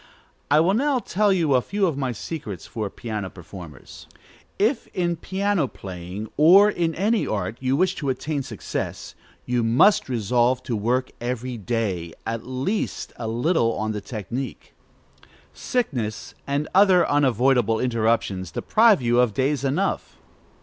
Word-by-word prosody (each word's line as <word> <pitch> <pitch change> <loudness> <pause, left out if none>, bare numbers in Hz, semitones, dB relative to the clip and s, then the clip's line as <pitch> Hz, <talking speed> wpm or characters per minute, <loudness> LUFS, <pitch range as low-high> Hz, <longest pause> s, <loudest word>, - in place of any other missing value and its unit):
I 150 +2 +5
will 180 +4 +3
now 275 +4 +2
tell 210 -2 +1
you 165 -7 +2
a 125 - +4
few 200 +8 0
of 165 -6 0
my 135 -2 -2
secrets 110 - -6
for 110 -3 -4
piano 105 -3 -5
performers. 85 -6 -12 0.5
If 225 +5 +1
in 175 -2 0
piano 190 -2 0
playing, 95 +1 -7
or 190 +8 +7
in 165 -4 -1
any 210 +4 +1
art, 100 +1 -2
you 130 +1 0
wish 185 +4 +2
to 140 - -2
attain 140 +3 -2
success, 125 -6 -5 0.3
you 125 -1 0
must 125 - +4
resolve 120 +2 +1
to 120 - -2
work 125 +5 0
every 125 +1 -3
day, 100 -7 -2
at 115 +1 -4
least 130 +12 -3
a 115 - -4
little, 120 +1 +1
on 110 0 -2
the 105 -1 -4
technique. 115 +5 -6 0.8
Sickness 125 - -3
and 140 +2 -1
other 185 -3 +5
unavoidable 125 -4 +2
interruptions 115 -6 0
deprive 215 - +3
you 120 +1 +3
of 120 -5 +2
days 140 +3 0
enough. 150 +9 -1
130 Hz, 145 wpm, -23 LUFS, 110-170 Hz, 0.8 s, or